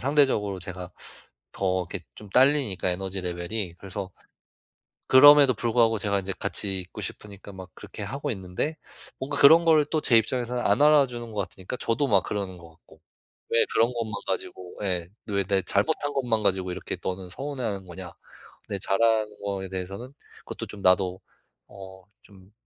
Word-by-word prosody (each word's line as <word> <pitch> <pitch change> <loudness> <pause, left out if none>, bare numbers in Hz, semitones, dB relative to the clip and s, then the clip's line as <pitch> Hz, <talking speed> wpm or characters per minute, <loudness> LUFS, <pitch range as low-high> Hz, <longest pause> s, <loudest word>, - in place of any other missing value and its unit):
상대적으로 130 -8 +2
제가 90 0 -7 0.6
더 95 -2 -1
이렇게 95 -4 -5
좀 105 -2 -12
달리니까, 130 -8 +3
에너지 95 +1 -4
레벨이. 90 +1 -4
그래서 100 0 -6 1.0
그럼에도 140 -1 +8
불구하고 115 0 +2
제가 100 0 0
인제 95 +1 -4
같이 100 -2 -1
있고 90 - -9
싶으니까 100 -1 -8
막 95 -1 -10
그렇게 105 - -9
하고 135 +8 -4
있는데 95 - -4 0.4
뭔가 140 +2 -3
그런 160 +4 +8
걸 160 -2 +5
또 155 - -1
제 115 -2 +5
입장에서는 125 +2 -1
안 - - +3
알아 150 -2 +6
주는 120 -2 -8
것 105 - -2
같으니까 95 +6 -7
저도 135 +5 0
막 100 -6 +3
그러는 95 -3 -4
것 85 -1 -13
같고. 80 - -22 0.5
'왜 115 - +4
그런 115 +2 +3
것만 115 -3 -4
가지고' 90 -1 -5
예. 90 -3 -2 0.2
'왜 100 -1 0
내 95 0 +1
잘못한 145 -2 0
것만 120 -5 0
가지고 95 -2 0
이렇게 - - -5
너는 90 -1 -4
서운해하는 120 -7 -4
거냐.' 90 0 -9 0.6
근데 100 -1 -4
잘하는 110 +2 +1
거에 95 -1 -3
대해서는 95 +7 -6 0.3
그것도 - - -6
좀 100 - -10
나도 90 0 +2 0.5
어 95 -1 -12 0.2
좀 95 -1 -19
100 Hz, 355 characters per minute, -26 LUFS, 95-125 Hz, 1.0 s, 그럼에도